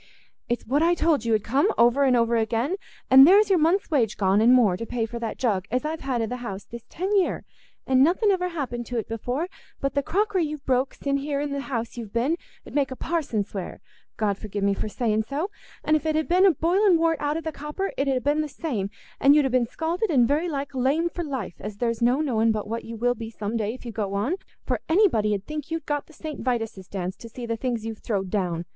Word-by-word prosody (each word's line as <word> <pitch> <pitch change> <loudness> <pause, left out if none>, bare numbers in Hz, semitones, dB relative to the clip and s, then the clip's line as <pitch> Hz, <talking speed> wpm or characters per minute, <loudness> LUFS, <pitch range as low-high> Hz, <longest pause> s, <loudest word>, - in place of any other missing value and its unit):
"It's 240 - -1
what 280 +5 +1
I 340 +1 +4
told 315 -8 +1
you 225 -1 +3
'ud 210 - -1
come, 275 - +2
over 240 +4 +4
and 255 -2 +4
over 235 0 +2
again; 230 - 0 0.3
and 265 +2 +10
there's 400 +2 +6
your 370 - +5
month's 335 +4 +2
wage 235 -8 +1
gone, 195 +1 +3
and 235 +2 +6
more, 235 -8 +5
to 230 +5 -6
pay 235 -2 -1
for 235 +1 -6
that 230 -1 -4
jug 200 -7 0
as 250 +5 -1
I've 315 +1 -2
had 255 -4 -1
i' - - +1
the 250 +3 -4
house 200 -5 -6
this 235 -1 -10
ten 385 +4 -1
year, 385 -3 +1 0.4
and 260 0 +4
nothing 375 +7 +3
ever 360 -2 +1
happened 245 -8 -4
to't 235 -3 -3
before; 245 +8 -2 0.3
but 275 - -1
the 280 - +1
crockery 395 +4 0
you've 300 -2 -5
broke 260 +1 +1
sin' 280 0 -1
here 280 0 -2
in 285 -1 -2
th' 280 - -2
house 235 -4 -4
you've 225 -4 -6
been 250 +8 +1 0.3
'ud - - -11
make 285 -2 +1
a 260 - -6
parson 285 -10 -1
swear—God 200 +1 -5
forgi' 205 -1 -5
me 200 0 +3
for 215 - -3
saying 220 -1 0
so—an' 305 - -3
if 310 +1 -1
it 310 - +1
had 315 0 0
been 370 +2 +5
boiling 355 +5 +3
wort 325 -2 +1
out 295 +1 0
o' - - -3
the 320 0 -4
copper, 300 +7 -4
it 275 - -1
'ud 265 -2 +2
ha' - - -21
been 295 +2 +2
the 305 - -2
same, 240 - -3 0.3
and 280 +1 +6
you'd 300 -2 +4
ha' 265 - 0
been 250 -2 +2
scalded 335 - -2
and 250 -7 +4
very 310 +6 +1
like 280 -2 -4
lamed 280 +7 +1
for 345 - -4
life, 265 - -5
as 210 0 -7
there's 230 0 -1
no 245 +5 +3
knowing 230 -6 +2
but 215 -1 -2
what 230 +2 -3
you 230 0 -7
will 245 +2 +2
be 225 -1 -7
some 215 0 -4
day 220 0 -1
if 255 - -14
you 235 - -5
go 205 -3 -3
on; 215 - 0 0.3
for - - -1
anybody 275 - +3
'ud 195 - -5
think 305 0 -6
you'd 330 0 -3
got 290 -1 -2
the - - -17
St. 310 -1 -7
Vitus's 225 -6 -2
Dance, 185 -1 -4
to 230 - -10
see 240 +1 -7
the 230 -1 -2
things 235 -1 -3
you've 225 -1 -5
throwed 195 -4 -2
down. 175 -5 -1
255 Hz, 250 wpm, -25 LUFS, 225-310 Hz, 0.4 s, and